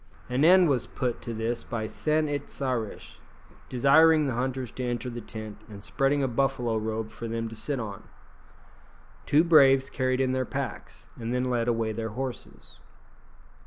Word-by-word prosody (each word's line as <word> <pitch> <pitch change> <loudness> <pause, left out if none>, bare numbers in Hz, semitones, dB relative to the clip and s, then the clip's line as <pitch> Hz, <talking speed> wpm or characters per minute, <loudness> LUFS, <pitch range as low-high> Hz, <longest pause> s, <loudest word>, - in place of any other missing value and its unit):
An 125 +3 +1
end 180 +2 +7
was 135 -5 0
put 125 -2 -3
to 120 - -6
this 115 +1 -2
by 115 -2 -4
San 155 +7 0
it 145 -1 -3
sa 135 -2 -3
rish 115 -4 -5 0.5
desiring 155 +5 +5
the 135 - -1
hunters 130 0 -2
to 130 - -6
enter 120 0 -3
the 120 0 -6
tent, 110 -1 -8
and 100 -1 -10
spreading 140 +4 +1
a - - +2
buffalo 125 -2 0
robe 110 0 -3
for 115 - -7
them 115 0 -3
to 115 - -9
sit 140 +4 -3
on. 105 -4 -6 1.2
Two 150 +3 +5
braves 135 -5 +5
carried 130 0 0
in 130 -1 +2
their 130 0 0
packs, - - -6
and 115 +1 -3
then 125 - 0
led 120 -2 0
away 115 -2 0
their 110 +1 -4
horses. 125 +3 -7
125 Hz, 175 wpm, -27 LUFS, 115-135 Hz, 1.2 s, end